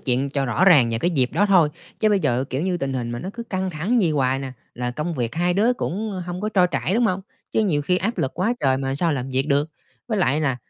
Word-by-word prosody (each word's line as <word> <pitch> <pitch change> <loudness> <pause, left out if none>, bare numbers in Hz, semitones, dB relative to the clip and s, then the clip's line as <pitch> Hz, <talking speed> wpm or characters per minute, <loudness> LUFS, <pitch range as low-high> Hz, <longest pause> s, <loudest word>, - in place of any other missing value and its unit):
chuyện 130 +2 0
cho 140 -1 -1
rõ 120 +10 +2
ràng 145 -11 +6
về 115 - -1
cái 175 - +1
dịp 130 -6 +1
đó 205 +6 +2
thôi. 180 -6 +5 0.3
Chứ 215 - +4
bây 205 -2 +2
giờ 125 -4 +1
kiểu 135 +5 -2
như 185 -1 0
tình 135 -5 -3
hình 120 -2 -3
mà 120 - -4
nó 180 - -6
cứ 235 - -5
căng 190 -4 -3
thẳng 180 +10 0
vậy 175 -7 +2
hoài 135 -3 +1
nè, 135 -1 -6 0.2
là 125 0 -2
công 150 +7 -3
việc 120 -4 -3
hai 175 +1 +1
đứa 220 +6 +3
cũng 205 -3 -3
hông 180 0 -5
có 215 - -1
trôi 185 -4 +3
chảy, 145 - -1
đúng 235 +1 +3
hông? 185 -2 -1 0.3
Chứ - - +1
nhiều 150 -7 +1
khi 180 +5 +1
áp 225 +6 -2
lực 130 - -1
quá 220 +7 +1
trời 130 -1 +2
mà 135 0 -2
sao 165 +3 +1
làm 135 -1 -3
việc 130 +2 +1
được? 145 +2 +2 0.4
Với 215 -3 0
lại 150 -5 +2
là 140 -5 0
155 Hz, 285 wpm, -22 LUFS, 135-190 Hz, 0.4 s, ràng